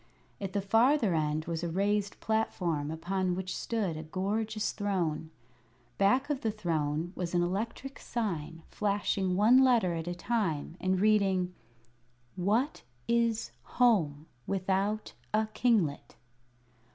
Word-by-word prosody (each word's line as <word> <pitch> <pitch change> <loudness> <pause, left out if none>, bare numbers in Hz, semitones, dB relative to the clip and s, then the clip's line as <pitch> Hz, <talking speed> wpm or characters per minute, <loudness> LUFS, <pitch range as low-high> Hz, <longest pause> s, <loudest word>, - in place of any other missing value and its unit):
At 195 -2 -4
the 200 -2 0
farther 225 - +3
end 155 0 0
was 165 0 -3
a 170 - -1
raised 200 +3 0
platform 175 -9 0
upon 180 +3 -1
which 185 0 -4
stood 210 -8 -2
a 155 - -5
gorgeous 210 +6 -2
throne. 175 -6 -1 0.7
Back 205 +7 +3
of 275 - -2
the 225 - 0
throne 165 -5 -1
was 175 -1 -3
an 175 - +3
electric 225 +9 -3
sign, 165 -8 -3
flashing 200 -2 0
one 220 +7 +6
letter 235 -9 +4
at 165 0 -4
a 175 - -2
time, 175 -7 -1
and 185 0 +1
reading: 195 -3 +2 0.8
"What 215 - 0 0.3
is 235 -1 +1 0.3
Home 170 - +3 0.2
without 195 +2 -1 0.2
a 220 0 +3
kinglet?" 205 - +1
195 Hz, 125 wpm, -30 LUFS, 170-220 Hz, 0.8 s, one